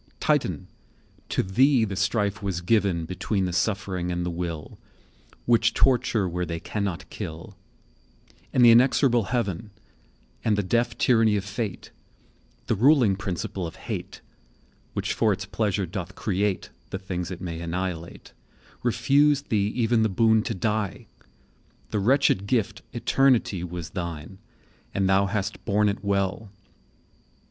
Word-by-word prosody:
II. -, -, -33 dB
Titan! -, -, 0 dB, 0.6 s
to -, -, +1 dB
thee 125 Hz, +5 st, +3 dB
the 100 Hz, -2 st, -4 dB
strife 105 Hz, +1 st, 0 dB
was 95 Hz, -4 st, -2 dB
given 90 Hz, -3 st, +1 dB
Between 95 Hz, +3 st, -1 dB
the 90 Hz, -, -3 dB
suffering 95 Hz, -1 st, -1 dB
and 85 Hz, 0 st, -2 dB
the 90 Hz, -, -2 dB
will, 85 Hz, -3 st, -5 dB, 0.7 s
Which 115 Hz, -1 st, +3 dB
torture 120 Hz, -6 st, +2 dB
where 90 Hz, +1 st, -2 dB
they 85 Hz, -1 st, -4 dB
cannot 100 Hz, -1 st, -3 dB
kill; 85 Hz, +5 st, -7 dB, 1.0 s
And 125 Hz, -, +5 dB
the 120 Hz, -, +9 dB
inexorable 120 Hz, -1 st, +4 dB
Heaven, 110 Hz, -3 st, -2 dB, 0.7 s
And 105 Hz, -2 st, +2 dB
the 105 Hz, -, +1 dB
deaf 115 Hz, +4 st, 0 dB
tyranny 115 Hz, -4 st, +4 dB
of 100 Hz, -, -3 dB
Fate, 105 Hz, 0 st, -5 dB, 0.7 s
The -, -, 0 dB
ruling 120 Hz, -2 st, +4 dB
principle 95 Hz, -2 st, -4 dB
of 80 Hz, -, -10 dB
Hate,20 -, -, -6 dB, 0.7 s
Which -, -, -2 dB
for 110 Hz, -, +2 dB
its 100 Hz, 0 st, -2 dB
pleasure 100 Hz, -1 st, -1 dB
doth 90 Hz, +1 st, -6 dB
create 100 Hz, -1 st, -1 dB, 0.2 s
The -, -, -3 dB
things 90 Hz, -2 st, -4 dB
it 90 Hz, -, -6 dB
may 85 Hz, -3 st, -5 dB
annihilate, 85 Hz, 0 st, -5 dB, 0.5 s
Refused 140 Hz, +5 st, +2 dB
thee 100 Hz, -2 st, +2 dB
even 120 Hz, -1 st, +2 dB
the 110 Hz, -, +2 dB
boon 110 Hz, +3 st, +3 dB
to 115 Hz, -, -2 dB
die: 105 Hz, 0 st, -2 dB, 0.9 s
The 105 Hz, -, 0 dB
wretched 105 Hz, -3 st, +2 dB
gift 110 Hz, -1 st, 0 dB
Eternity 120 Hz, -5 st, +2 dB
Was 85 Hz, -2 st, -6 dB
thine—and 95 Hz, +3 st, -6 dB
thou 95 Hz, +1 st, +3 dB
hast 100 Hz, 0 st, -3 dB
borne 105 Hz, +1 st, +2 dB
it 100 Hz, 0 st, -4 dB
well. 100 Hz, +1 st, -1 dB
100 Hz, 140 wpm, -25 LUFS, 90-115 Hz, 1.0 s, the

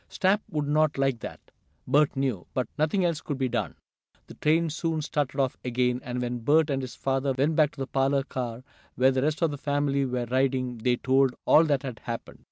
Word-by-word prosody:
Snap 200 Hz, +1 st, +2 dB
would 150 Hz, -2 st, -2 dB
not 155 Hz, 0 st, +2 dB
like 135 Hz, -3 st, +1 dB
that, -, -, -7 dB, 0.5 s
Bert 145 Hz, +3 st, +3 dB
knew, 130 Hz, -9 st, -2 dB
but 125 Hz, -3 st, 0 dB
nothing 155 Hz, +5 st, +1 dB
else 165 Hz, -3 st, 0 dB
could 145 Hz, -, -4 dB
be 130 Hz, -1 st, 0 dB
done. 115 Hz, -8 st, -2 dB, 0.5 s
The -, -, -12 dB
train 160 Hz, +1 st, +1 dB
soon 160 Hz, -1 st, -2 dB
started 145 Hz, -2 st, -2 dB
off 135 Hz, -2 st, 0 dB
again, 125 Hz, 0 st, 0 dB
and 125 Hz, 0 st, -4 dB
when 120 Hz, 0 st, -3 dB
Bert 150 Hz, +5 st, +3 dB
and 135 Hz, -1 st, 0 dB
his 130 Hz, -1 st, -7 dB
father 135 Hz, 0 st, 0 dB
went 150 Hz, +4 st, +2 dB
back 150 Hz, -2 st, +4 dB
to -, -, -14 dB
the -, -, -1 dB
parlor 135 Hz, +1 st, +1 dB
car 125 Hz, -3 st, -5 dB, 0.3 s
where 130 Hz, +1 st, +4 dB
the 130 Hz, 0 st, 0 dB
rest 155 Hz, +4 st, 0 dB
of 165 Hz, -, +2 dB
the 145 Hz, -, -6 dB
family 145 Hz, -1 st, 0 dB
were 125 Hz, -1 st, -2 dB
riding 130 Hz, -1 st, 0 dB
they 125 Hz, +2 st, +2 dB
told 130 Hz, +1 st, +2 dB
all 160 Hz, -, +6 dB
that 145 Hz, -3 st, +1 dB
had 125 Hz, -5 st, -6 dB
happened. 115 Hz, -1 st, -7 dB
135 Hz, 215 wpm, -27 LUFS, 125-150 Hz, 0.5 s, all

